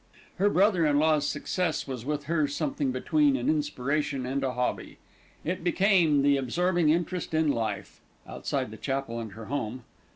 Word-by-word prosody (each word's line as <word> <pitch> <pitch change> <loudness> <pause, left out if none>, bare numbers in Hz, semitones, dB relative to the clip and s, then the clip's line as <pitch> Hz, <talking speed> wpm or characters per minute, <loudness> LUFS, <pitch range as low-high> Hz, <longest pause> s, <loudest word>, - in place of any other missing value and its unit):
Her 200 +3 +3
brother 195 -3 +3
in 145 -1 +3
law's 155 -1 +3
success 180 -2 -2
was 130 -4 -5
with 145 0 -2
her 155 0 +1
something 145 -1 -1
between 280 - +2
an - - -3
inspiration 150 - -1
and 135 +2 -2
a 130 -1 -1
hobby. 125 0 -3 0.5
It 180 +1 -2
became 175 -5 +3
the 140 0 +4
absorbing 170 +5 +1
interest 170 +1 0
in 155 -2 +3
life, 110 -5 -4 0.3
outside - - -3
the - - -9
chapel 135 -4 -3
and 110 -3 -6
her 110 0 -9
home. 125 -2 -4
150 Hz, 165 wpm, -28 LUFS, 130-175 Hz, 0.5 s, the